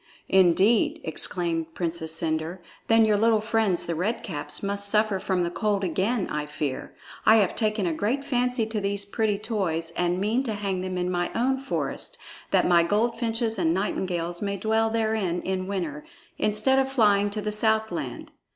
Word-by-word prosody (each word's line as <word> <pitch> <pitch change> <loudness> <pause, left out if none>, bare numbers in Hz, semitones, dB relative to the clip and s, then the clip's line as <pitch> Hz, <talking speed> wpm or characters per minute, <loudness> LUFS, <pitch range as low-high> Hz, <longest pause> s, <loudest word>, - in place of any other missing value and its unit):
"Indeed!" 190 +4 +4
exclaimed 165 0 -2
the - - -28
Princess 165 -2 -2
Cendre. 160 +1 -2 0.3
"Then 225 0 +5
your 210 -1 +3
little 225 +1 +4
friends, 220 -4 +1
the 170 - -2
Red 195 +8 -2
Caps, 145 -4 -4
must 200 0 0
suffer 210 -2 +2
from 185 -1 0
the 170 - -2
cold 205 0 0
again, 190 +5 0
I 150 0 -3
fear. 145 -2 -4 0.3
I 220 - +7
have 205 -5 +3
taken 215 -3 0
a 170 - 0
great 230 - -1
fancy 250 -3 0
to 220 -1 -3
these 200 0 -2
pretty 210 0 0
toys 185 -7 -2
and 175 +1 0
mean 215 +6 +1
to 225 - -2
hang 195 -3 -2
them 185 0 -3
in 180 0 -1
my 175 -1 0
own 260 +3 +2
forests, 270 0 -3 0.3
that - - +3
my 175 -1 +5
goldfinches 225 +3 0
and 165 -1 +2
nightingales 175 -3 -2
may 200 -1 -2
dwell 220 +3 +1
therein 220 -6 0
in 185 0 -2
winter, 170 -7 -3 0.4
instead 215 +6 +2
of 265 0 0
flying 205 -5 +3
to 210 +1 -4
the 210 0 -2
southland." 220 +1 -1
200 Hz, 180 wpm, -26 LUFS, 175-220 Hz, 0.4 s, I